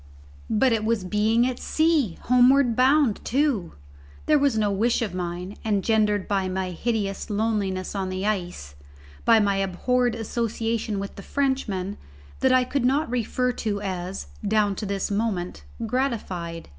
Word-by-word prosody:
But 230 +3 +3
it 220 -1 0
was 220 -2 0
being 215 +5 +2
at 255 -1 -2
sea! 310 - +1
homeward 250 0 +4
bound 260 -2 +3
too! 255 - 0 0.5
There 300 -1 +4
was 280 -5 +2
no 210 -2 +2
wish 230 +4 +1
of 205 -5 -4
mine, 180 +2 -5
engendered 210 -1 +1
by 195 -2 0
my 185 0 -2
hideous 205 +1 -2
loneliness 205 -3 -1
on 195 -2 -2
the 185 +1 -3
ice, 180 - -3 0.5
by 230 -1 +6
my 200 -2 +2
abhorred 235 +6 0
association 225 -1 -2
with 200 0 -5
the - - -7
Frenchman, 210 -8 -2 0.4
that 265 - +3
I 255 0 +5
could 260 +1 -2
not 270 +1 +1
refer 250 +1 0
to 215 -4 -3
as, 185 0 -4 0.2
down 210 -1 +2
to 210 - -4
this 200 0 -2
moment, 195 - -2 0.2
gratified. 205 -10 -3
215 Hz, 150 wpm, -25 LUFS, 195-245 Hz, 0.5 s, by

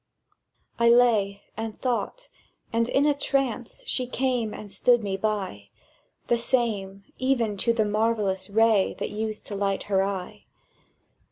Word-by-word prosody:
I 235 0 +5
lay, 220 -5 +3
and 220 -1 -5
thought; 255 - -2 0.4
and 230 +1 +1
in 280 - +3
a 295 - +4
trance 270 -4 -2
She 255 - -1
came 250 -3 0
and 210 -1 -9
stood 240 +4 +3
me 195 -2 -1
by— 195 - -3 0.6
The 235 - +1
same, 210 -6 -1 0.2
even 245 -5 +1
to 235 +5 +2
the 225 -2 +1
marvellous 210 -3 0
ray 220 -1 +3
That - - -4
used 215 0 -4
to 205 - -6
light 195 -1 -1
her 195 -2 +1
eye. 185 - -5
220 Hz, 145 wpm, -26 LUFS, 200-240 Hz, 0.6 s, I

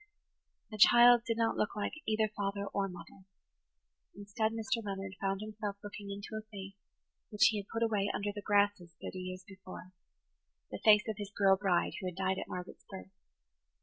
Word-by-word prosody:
The 215 - -7
child 240 +2 +7
did 230 -1 0
not 230 -1 +1
look 210 - -1
like 210 - -2
either 220 0 +2
father 200 0 -2
or 200 -1 0
mother. 185 +1 -12 0.9
Instead, 205 +2 -1
Mr. 225 +1 -2
Leonard 195 -1 -5
found 195 0 -1
himself 210 -1 -5
looking 205 0 -8
into 200 0 -6
a 215 - -3
face 195 -2 -8 0.6
which 200 -3 +5
he 215 - -2
had 200 - -8
put 225 +1 -2
away 210 -3 +1
under 205 0 -2
the 205 - -6
grasses 205 -4 +1
thirty 185 - -6
years 185 0 -6
before,–the 185 -2 -13
face 215 +1 +6
of 220 -2 -3
his 205 -1 -5
girl 195 -2 +4
bride, 190 -3 +1
who 190 - -4
had 180 - -5
died 190 0 0
at - - -5
Margaret's 180 0 -8
birth. 95 0 -9
200 Hz, 180 wpm, -33 LUFS, 190-215 Hz, 0.9 s, child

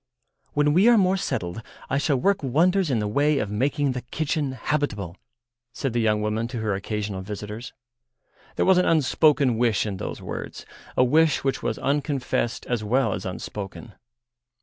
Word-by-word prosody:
"When 145 0 +3
we 190 +7 +5
are 240 -1 +7
more 190 -2 +3
settled 115 - -3 0.3
I 135 - 0
shall 145 -1 +1
work 195 +9 +1
wonders 170 +7 +2
in 130 - +1
the 105 -1 -1
way 145 +7 +2
of 105 -5 -2
making 140 +6 0
the 125 -1 -4
kitchen 145 +2 -2
habitable," 115 - -2 0.6
said 130 -1 -3
the 120 - +1
young 105 -1 +1
woman 110 +2 -1
to 120 0 -6
her 110 -2 0
occasional 100 0 -3
visitors. 105 +4 -7 0.8
There - - +1
was 190 -1 +5
an 180 - +2
unspoken 145 -5 +3
wish 115 -4 +2
in 100 -3 -3
those - - -5
words, - - -7 0.3
a - - +6
wish 155 +4 +3
which 135 -1 -1
was - - -2
unconfessed 135 -4 -1
as 120 -3 -2
well 115 0 +1
as - - -4
unspoken. 100 +4 -7
125 Hz, 170 wpm, -24 LUFS, 105-150 Hz, 0.8 s, are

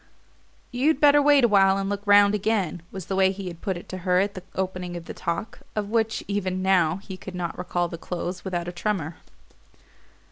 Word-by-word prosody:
"You'd 270 +4 +2
better 290 -1 +6
wait 290 -2 +5
awhile 195 -4 +5
and 195 0 -2
look 200 0 -2
round 205 0 +6
again," 200 -5 0
was 190 -3 -7
the 195 - -3
way 190 0 +4
he 195 -1 -6
had 170 -1 -11
put 190 -3 -2
it 175 - -11
to 185 - -5
her 180 0 +2
at 200 +1 0
the 185 - -7
opening 185 -2 -3
of 170 - -9
the - - -7
talk 170 +5 -4 0.2
of 210 -1 -2
which, 225 -1 0
even 185 -2 -2
now, 180 -4 +3
he 195 0 -9
could 185 0 -9
not 175 -2 -3
recall 175 -1 -1
the 170 -1 -8
close 180 +1 -5
without 175 -2 -3
a - - -3
tremor. 175 -3 -3
190 Hz, 210 wpm, -25 LUFS, 180-205 Hz, 0.2 s, better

